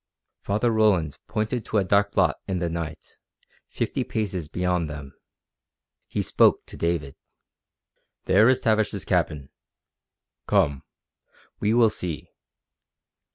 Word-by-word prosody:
Father 105 +4 0
Roland 100 -9 +2
pointed 110 +2 -2
to 110 - -1
a 100 - +3
dark 100 +2 +2
blot - - +2
in 95 - -1
the 85 -1 -2
night, 80 -2 -6 0.5
fifty - - -2
paces 95 -7 -3
beyond 90 -1 -1
them. 70 -2 -8 0.9
He - - -2
spoke - - +3
to - - -11
David. 85 -5 -1 1.1
"There 105 +6 +5
is 130 - +3
Tavish's 110 -3 +1
cabin. 80 -6 0 1.0
Come. 70 -2 +2 0.8
We 110 +2 +1
will 115 -3 +5
see." 90 -7 -4
90 Hz, 115 wpm, -25 LUFS, 80-110 Hz, 1.1 s, There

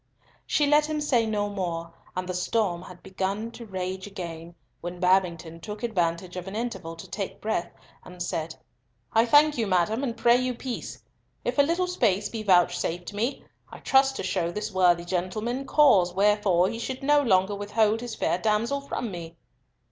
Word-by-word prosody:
She 295 - +2
let 295 +1 +4
him 310 -1 -2
say 250 -6 +2
no 205 -1 0
more, 170 -4 -4 0.2
and 185 0 -3
the 185 - -3
storm 180 -1 0
had 180 -1 -12
begun 195 +4 -3
to 235 -1 -10
rage 190 0 -4
again, 170 -4 -7 0.2
when 175 +1 -6
Babington 175 -3 +1
took 210 +6 -8
advantage 180 -5 -1
of 180 0 -6
an 195 - -6
interval 205 -8 -4
to 165 - -10
take 195 0 -5
breath, 215 -5 -2 0.3
and 180 0 -12
said, 165 -2 -3 0.6
"I 225 +1 +4
thank 295 +1 +5
you, 225 - +1
madam, 195 +7 +1
and 235 -4 -2
pray 235 +1 +5
you 255 0 -1
peace. 245 0 -6 0.4
If - - -1
a - - +10
little 335 +5 +1
space 210 - +1
be 225 - -5
vouchsafed 175 -2 +2
me, 230 +7 -2 0.3
I - - -10
trust 270 0 +3
to - - -4
show 170 -3 0
this 210 +5 -4
worthy 175 -2 +3
gentleman 215 +9 -2
cause 190 -13 +5
wherefore 200 -3 +3
he 230 - -4
should 260 +3 -5
no 290 +1 +4
longer 190 -5 +3
withhold 210 +2 +1
his 240 -2 -5
fair 175 - 0
damsel 225 +7 0
from 245 -5 -4
me." 170 -2 -8
205 Hz, 180 wpm, -26 LUFS, 180-235 Hz, 0.6 s, a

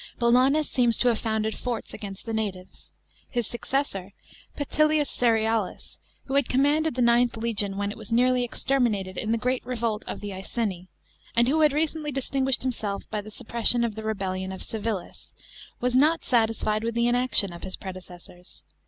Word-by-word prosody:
Bolanus 260 +5 +4
seems 240 -3 +2
to 250 - +4
have 230 - +1
founded 220 -1 -1
forts 245 -3 -4
against 195 0 -8
the 225 - -4
natives. 195 -4 -4 0.4
His 240 -2 -1
successor, 235 -6 -2 0.4
Petillius 305 +1 +2
Cerealis, 225 -4 0 0.3
who 270 - -5
had 280 -3 +2
commanded 290 +3 +2
the 250 - +2
IXth 235 0 +3
legion 210 -4 +1
when 200 0 -1
it - - -8
was 220 -1 -9
nearly 250 +1 +3
exterminated 235 -7 0
in 220 +4 -2
the 230 - +2
great 250 +3 -1
revolt 230 -3 -2
of - - -5
the 205 -1 -6
Iceni, 190 -1 -3 0.5
and 235 +1 +4
who 310 +4 +2
had 305 -1 +6
recently 305 0 -1
distinguished 270 -1 0
himself 215 -6 -3
by 210 -1 -1
the 210 - -10
suppression 235 +2 0
of 230 -2 -1
the 220 - -6
rebellion 190 -3 -2
of 190 - -6
Civilis, 215 -4 -5 0.4
was 250 0 0
not 310 +5 +4
satisfied 220 -2 +1
with 230 0 -2
the 235 0 +2
inaction 240 -6 +3
of 170 - -9
his 190 - -4
predecessors. 180 -1 -10
230 Hz, 170 wpm, -26 LUFS, 205-255 Hz, 0.5 s, had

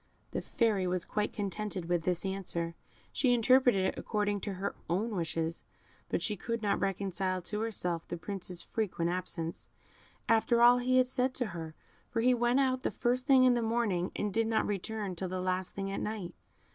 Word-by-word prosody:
The - - -2
Fairy 210 -6 +1
was 180 0 0
quite 210 0 -1
contented 205 -3 -2
with 175 -2 0
this 180 +1 0
answer; 175 -3 -3 0.4
she 245 -3 +3
interpreted 245 -4 +4
it - - -1
according 205 -2 0
to 200 - -3
her 195 +2 -3 0.2
own 205 +7 0
wishes, 165 -1 -2 0.5
but - - 0
she 210 - 0
could 230 +3 -3
not 205 - +1
reconcile 190 -1 -1
to 210 +4 -3
herself 180 -7 -2
the 175 - -4
Prince's 180 0 -4
frequent 175 -6 -1
absence, 170 -2 -4 0.6
after 230 +1 +3
all 240 +1 +7
he 255 +1 +2
had 255 0 +5
said 255 0 0
to 250 - +1
her; 160 -2 -6 0.3
for 230 - 0
he 250 +2 +5
went 240 +2 +2
out 260 -1 +2
the - - 0
first 255 +2 0
thing 265 -2 +7
in 255 -1 +6
the 240 - +1
morning, 220 -6 0
and 205 -2 -2
did 225 0 +2
not 225 -1 +1
return 205 -1 -3
till 185 +2 -4
the 185 0 -3
last 185 0 -1
thing 195 0 -3
at - - -2
night. 210 -5 -4
205 Hz, 195 wpm, -31 LUFS, 180-235 Hz, 0.6 s, all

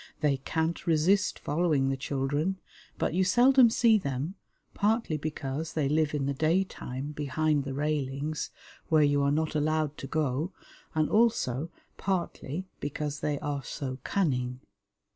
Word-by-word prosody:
They 145 -2 +3
can't 160 +5 -2
resist 170 +5 +3
following 150 -3 +1
the 135 - 0
children, 145 +7 -1 0.4
but - - 0
you 185 +2 +3
seldom 245 +6 +6
see 225 -1 +4
them, 140 +2 -3 0.4
partly 215 -5 +1
because 150 0 -4
they 150 -3 +1
live 150 +1 +1
in 140 -2 0
the 140 - 0
daytime 150 -3 -1
behind 150 0 0
the 135 -1 -4
railings, 145 0 -2 0.4
where 155 -2 +5
you 145 -1 +3
are 140 - +3
not 155 +2 0
allowed 155 0 0
to 135 - -6
go, 155 +3 -1 0.4
and 155 -1 +3
also 170 - +2 0.3
partly 185 -3 -2
because 145 0 -3
they 145 -1 -1
are 145 -2 -2
so 130 -1 -5
cunning. 125 -9 0
150 Hz, 145 wpm, -29 LUFS, 140-170 Hz, 0.4 s, seldom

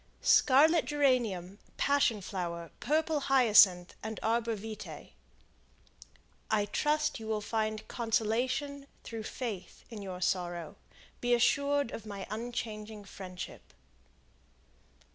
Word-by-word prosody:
Scarlet 305 +5 +5
Geranium, 235 -10 +1 0.2
Passion 275 -7 +2
Flower, 170 -3 -5
Purple 315 0 +1
Hyacinth, 215 -10 +5
and 220 0 -5
Arbor 230 +1 +1
Vitae 210 -6 -8 1.4
"I 210 -2 +2
trust 300 +8 0
you 220 - -8
will 220 -1 0
find 215 0 -2
consolation, 250 +5 -1 0.2
through 225 -1 -6
faith, 215 -4 -6
in 215 -3 -7
your 185 -2 -6
sorrow; 175 -1 -2 0.4
be 245 0 +3
assured 280 +2 +2
of 220 - -7
my 200 -2 -6
unchanging 215 -2 -5
friendship." 185 -2 -9
220 Hz, 105 wpm, -31 LUFS, 200-260 Hz, 1.4 s, Scarlet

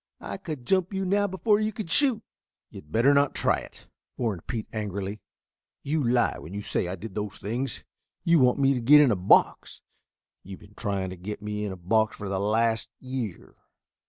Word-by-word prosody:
I - - -5
could 155 -10 -7
jump 185 - +1
you 190 0 -1
now 205 +2 +2
before 205 +2 +1
you 215 0 0
could 205 -5 -6
shoot." 255 -4 +3 0.5
"You'd 75 - -12
better 120 - +4
not 140 -1 +2
try - - +2
it," - - -11 0.3
warned 105 -9 -3
Pete 115 -4 -4
angrily. 100 -1 -4 0.6
"You 150 +1 0
lie 120 0 +2
when 90 +6 -9
you 105 - -4
say 90 - -1
I 90 - -3
did 100 +2 -9
those 105 -1 -4
things. 120 +6 -4 0.4
You 170 -1 +4
want 125 -2 +4
to 135 -1 +3
get 140 +6 +7
me 150 - +8
in 135 - +3
a - - +2
box. 90 +1 +2 0.6
You've 95 0 -10
been 105 0 -17
trying 100 -4 -3
to 95 - -8
get 105 +4 -7
me 105 0 -3
in 100 - -3
a 95 - -7
box 110 +5 +1
for 100 - -6
the 95 -1 -1
last 110 +3 +1
year." 130 -8 -6
115 Hz, 200 wpm, -26 LUFS, 100-150 Hz, 0.6 s, me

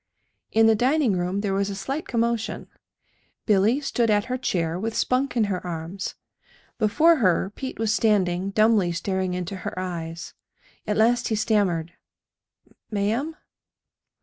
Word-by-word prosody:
In 225 0 +4
the 225 - +6
dining 255 +1 +2
room 180 +3 -1
there 200 -2 -1
was 195 +1 0
a 200 - -4
slight 270 +10 -4
commotion. 235 -1 -1 0.8
Billy 215 +5 +3
stood 240 -5 0
at 205 0 +2
her 255 0 -2
chair 170 -7 -1
with 225 +3 -3
Spunk 255 0 0
in 230 - +4
her 195 -3 -2
arms. 170 +2 -5 0.6
Before 305 +10 +4
her 190 - +2
Pete 260 -1 -6
was 220 -1 +1
standing, 195 -4 +1
dumbly 210 -4 +3
staring 185 +1 -2
into 180 +2 -4
her 185 - -6
eyes. 170 -2 -5 0.5
At 210 - 0
last 240 +3 +3
he 220 - 0
stammered: 185 -7 0 1.0
"Ma'am?" 225 +9 -1
205 Hz, 145 wpm, -24 LUFS, 185-230 Hz, 1.0 s, the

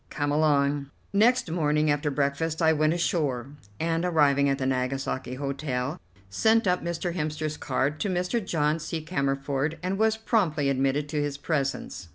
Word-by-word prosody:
Come 145 -1 -1
along." 145 -2 +2 0.2
Next 225 -2 +3
morning 150 -2 +2
after 145 +1 0
breakfast 145 +3 -1
I 160 -1 +4
went 155 +1 +2
ashore, 140 -7 -1 0.3
and, 165 +1 0
arriving 145 -5 +3
at 135 - +1
the 135 - -2
Nagasaki 130 0 -2
Hotel, 135 -1 -3 0.3
sent 220 - +3
up 180 -1 +1
Mr. 170 0 -2
Hemster's 155 -2 -2
card 145 +2 -1
to 205 - -1
Mr. 180 +5 -1
John 155 -3 0
C. 160 0 -4
Cammerford, 140 -1 -1
and 190 +2 -1
was 220 0 +3
promptly 170 - +1
admitted 135 +2 +1
to 150 -1 -1
his 145 -1 -2
presence. 140 - -3
150 Hz, 160 wpm, -27 LUFS, 140-165 Hz, 0.3 s, I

